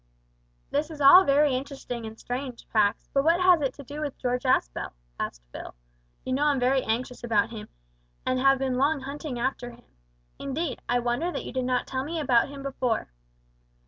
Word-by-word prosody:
"This 295 +2 0
is 310 -2 -9
all 325 +7 +9
very 285 -1 +4
interesting 255 -3 -5
and 220 0 -10
strange, 250 -1 -5
Pax, 210 -1 +2
but 275 - +3
what 335 +3 +4
has 365 -3 +5
it 270 -2 +1
to 285 - -10
do 290 +3 -7
with 290 -3 -4
George 250 0 -2
Aspel?" - - 0 0.3
asked - - -4
Phil. - - -8 0.5
"You 255 - -1
know 285 +3 +2
I'm 290 -3 +3
very 260 +2 +3
anxious 245 +3 -3
about 225 -2 +1
him, 220 -2 -7 0.6
and 255 0 +1
have 270 0 +4
long 270 +4 +2
been 270 - -8
hunting 285 -1 -5
after 245 0 -2
him. 240 0 -16 0.5
Indeed, 280 +3 -3
I 245 - +3
wonder 245 +8 0
that - - -5
you - - -7
did 255 -1 -1
not 250 -1 0
tell 260 0 -3
me 325 +3 -3
about 255 -4 +3
him 280 -1 -8
before." 255 -4 -1
265 Hz, 195 wpm, -27 LUFS, 245-285 Hz, 0.6 s, all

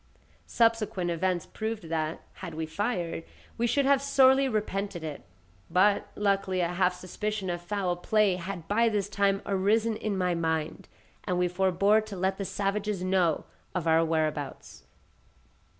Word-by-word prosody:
Subsequent 225 -6 +1
events 175 0 0
proved 220 -2 -4
that, 160 -1 -2 0.2
had 170 -4 -6
we 160 0 -2
fired, 170 -1 -2 0.3
we 235 - 0
should 275 +4 +2
have 275 0 +4
sorely 270 -1 +5
repented 200 -5 -2
it, 155 -2 -5 0.5
but 195 +4 +3
luckily 195 -2 +1
a 170 -1 +1
half 180 0 +1
suspicion 190 +1 -3
of 175 0 -4
foul 185 -1 -1
play 200 +1 +2
had 175 -2 -6
by 230 +3 +3
this 205 -2 -1
time 200 -1 +1
arisen 210 +3 +1
in 210 -2 -2
my 180 -1 +1
mind, 160 -2 -2 0.4
and 180 - 0
we 180 0 +2
forbore 190 +4 +3
to 215 -2 -8
let 190 +2 0
the 195 - -2
savages 200 0 -2
know 185 -4 +1 0.3
of 180 -3 -1
our 165 0 +4
whereabouts. 155 -3 -2
190 Hz, 150 wpm, -28 LUFS, 175-210 Hz, 0.5 s, sorely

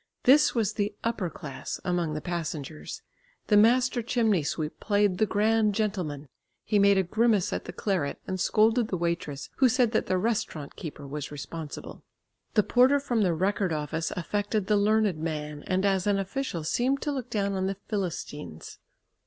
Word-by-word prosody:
This 290 +3 +5
was 215 -3 +1
the 205 -1 -2
"upper 215 -6 -1
class" 150 -5 -6
among 175 -4 0
the 155 - -3
passengers. 160 -3 -5 0.5
The 210 - +5
master 245 +4 +4
chimney 225 -5 +2
sweep 150 +1 -3
played 205 -3 +1
the 215 - +3
grand 215 0 +2
gentleman, 180 -10 -2 0.4
he 210 - +2
made 200 0 +5
a 190 - +3
grimace 210 +1 +2
at - - -3
the - - -6
claret 185 -9 -1
and 185 0 -3
scolded 220 +5 +3
the 185 - -2
waitress 170 -4 -3
who 260 -2 +5
said 240 -1 +2
that 220 - 0
the 185 - +1
restaurant 205 -8 -2
keeper 150 -3 -7
was 145 +1 -5
responsible. 150 +1 -7 0.5
The 210 - +5
porter 255 +6 +4
from 245 -5 0
the 180 -4 +2
Record 190 +1 0
Office 155 +1 -2
affected 205 +4 -1
the 210 - +2
learned 205 -4 +2
man, 150 -2 -4
and 190 +1 +1
as 195 -1 +1
an 200 -1 +3
official 195 - -3
seemed 255 - 0
to 295 - -1
look 260 -4 -4
down 200 -2 0
on 190 0 -1
the 195 - -2
"Philistines." 175 - -5
195 Hz, 175 wpm, -27 LUFS, 165-220 Hz, 0.5 s, This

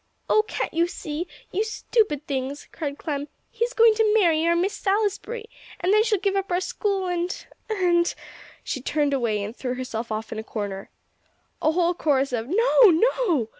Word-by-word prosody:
"Oh, 430 - +5
can't - - -3
you 335 +1 +2
see? 325 0 -5 0.2
You 410 - +1
stupid 425 - 0
things!" 275 -1 -4
cried 290 -3 -4
Clem. 290 -2 -3 0.2
"He's 470 +1 -1
going 460 -2 +6
to 430 -1 +2
marry 335 -7 +4
our 340 - +4
Miss 370 +4 +1
Salisbury, 425 +3 -1 0.3
and 370 +3 +2
then 430 0 +5
she'll 445 -2 +2
give 395 +1 0
up 390 -1 -1
our 355 - +2
school; 390 0 -1
and 355 0 -2 0.2
and 350 -5 +2 0.2
" - - -20
She 275 -6 -4
turned 290 +1 0
away, 225 -6 0
and 210 +3 -6
threw 250 -2 -3
herself 235 -3 -5
off 215 +1 -4
in 220 - -4
a - - -5
corner. 200 -3 -5 0.7
A 310 - +3
whole 350 0 +2
chorus 275 -6 +1
of 230 -1 -2
"No 460 - +5
no!" 345 - +2
345 Hz, 185 wpm, -24 LUFS, 275-415 Hz, 0.7 s, going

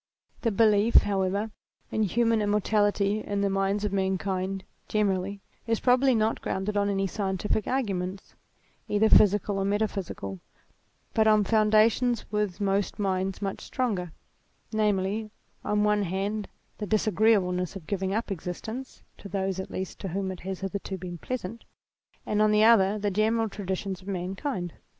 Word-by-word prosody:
~TheT>elief, 220 0 +4
however, 200 +2 0 0.4
in 220 - 0
human 225 +2 +2
immortality, 205 0 +2
in 205 -1 -2
the 200 -1 +1
minds 195 +1 0
of 205 - -2
mankind 190 0 -1 0.2
generally, 200 -1 0 0.3
is 225 -1 +1
probably 255 +1 +4
not 220 0 +1
grounded 190 +2 -2
on 205 0 +2
any 195 -1 0
scientific 195 +1 -1
arguments 195 -7 -2 0.5
either 215 +1 +3
physical 205 -1 +4
or - - 0
meta 205 +2 +1
physical, 100 - -6 0.7
but 220 -1 +3
on 215 -1 +5
foundations 220 +3 +3
with 210 -3 -1
most 200 0 0
minds 190 0 -1
much 195 -1 -3
stronger, 200 -10 -2 0.6
namely 210 0 0 0.3
on 210 0 +1
one 210 0 +3
hand 200 +3 -2 0.3
the 210 - -3
disagreeableness 200 -4 +2
of 185 -5 -8
giving 190 +1 -2
up 220 +1 -2
existence, 220 +8 -6 0.2
(to 200 - -9
those 190 0 -2
at 190 - -5
least 190 -1 -5
to - - -4
whom 190 +2 -2
it 185 - -7
has 190 0 -5
hitherto 195 0 -4
been 175 -1 -7
pleasant) 230 -1 -5 0.6
and 210 0 +1
on 215 - +5
the 210 0 +4
other 215 -3 +5
the 205 -1 -1
general 220 +3 +2
traditions 195 -2 -4
of 185 - -15
mankind. 185 - -3
200 Hz, 150 wpm, -27 LUFS, 190-215 Hz, 0.7 s, on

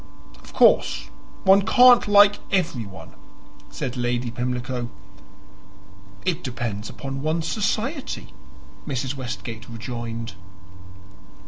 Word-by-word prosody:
"Of - - -14
course - - +3 0.3
one 195 +1 +6
can't 245 +1 +6
like 205 0 +6
everyone," 125 - -2 0.6
said 95 - -5
Lady 120 -1 -1
Pimlico. 125 0 -3 1.4
"It 180 -2 -1
depends 120 -5 -4
upon 135 -1 -6
one's 160 +2 -1
society," 225 - -2 0.5
Mrs. 130 -2 -2
Westgate 120 -3 -6
rejoined. 115 -1 -6
130 Hz, 90 wpm, -23 LUFS, 120-185 Hz, 1.4 s, one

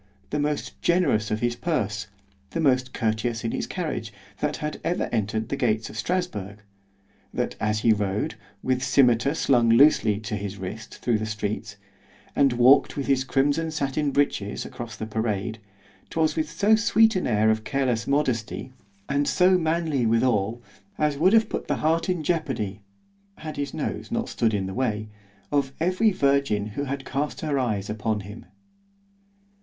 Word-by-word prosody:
—the 150 - 0
most 145 0 -2
generous 155 -12 +2
of 105 0 -1
his 120 0 0
purse—the 65 - -4
most 130 -4 +2
courteous 110 +1 -1
in 115 - -1
his - - -3
carriage, 150 - -4 0.3
that 150 0 -1
had 150 0 -5
ever 175 - 0
entered 110 -1 -1
the - - -1
gates 110 -5 0
of - - -12
Strasburg—that 100 - -5
as 105 -1 0
he 115 -1 +5
rode, 105 0 -1 0.3
with 130 0 +1
scymetar 130 +1 +3
slung 120 -7 +3
loosely 115 -4 +5
to 110 -1 -4
his 100 -1 -5
wrist, 100 +4 -7
thro' 120 -3 +1
the 110 0 -3
streets—and 105 +4 -3
walked 125 +5 +5
with 140 - -2
his 135 -2 +2
crimson 145 +4 +1
sattin 145 -1 -1
breeches 135 -8 0
across 115 -2 -7
the 110 - -5
parade—'twas 110 +5 -3
with 155 -1 -1
so 205 +7 +3
sweet 225 0 +4
an 185 - 0
air 110 -1 +3
of 110 0 -1
careless 125 -3 -1
modesty, 130 -3 -1 0.3
and 140 +1 +1
so 185 +1 +4
manly 160 -7 +1
withal——as 120 - 0
would 180 +8 +3
have 225 -1 +5
put - - -4
the - - +1
heart 165 +3 +1
in 180 -3 0
jeopardy 125 - -2 0.6
(had 155 -1 -7
his 145 0 -3
nose - - -4
not - - -1
stood 110 -2 +1
in 95 -2 -1
his 95 - -6
way) 110 -4 -1 0.4
of 140 -2 +1
every 185 +6 +3
virgin 140 - +1
who 140 +5 -2
had 135 0 -4
cast 145 +2 -3
her 150 -3 0
eyes 105 -6 -1
upon 105 0 -2
him. 105 +3 -10
120 Hz, 160 wpm, -25 LUFS, 110-150 Hz, 0.6 s, he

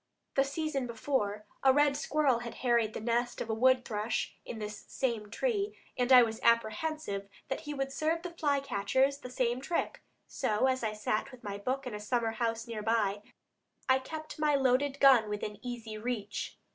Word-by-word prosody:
The 270 - +4
season 280 -2 -2
before, 220 -3 -1 0.2
a 265 - +7
red 290 +1 +4
squirrel 290 -4 +2
had 240 -1 -7
harried 235 -3 +3
the - - -2
nest 240 +2 0
of 225 - -3
a - - +1
wood 255 +2 +4
thrush 215 +1 -2
in 235 - -7
this 210 -1 -6
same 230 -6 -2
tree, 415 - -1 0.2
and 250 +1 0
I 250 -1 +10
was 225 -1 -2
apprehensive 230 -2 +1 0.2
that 270 - -1
he 295 - -3
would 270 0 -2
serve 320 +3 0
the 355 - -5
fly 290 -4 +1
catchers 265 +3 +1
the 250 - -8
same 250 0 0
trick; 335 +5 -2 0.2
so, 220 -2 0
as 260 -1 +1
I 215 -1 0
sat 215 +4 -1
with 255 -2 -14
my 200 -1 -5
book 260 +6 -2
in 250 - -5
a 210 - -4
summer 225 +1 0
house 230 0 -2
near 230 -3 -5
by, 210 -2 +1 0.7
I 260 0 +5
kept 310 +3 -7
my 300 -1 +3
loaded 275 +1 +2
gun 255 -6 +6
within 210 0 -4
easy 230 -3 -6
reach. 215 -3 -4
245 Hz, 190 wpm, -31 LUFS, 220-275 Hz, 0.7 s, I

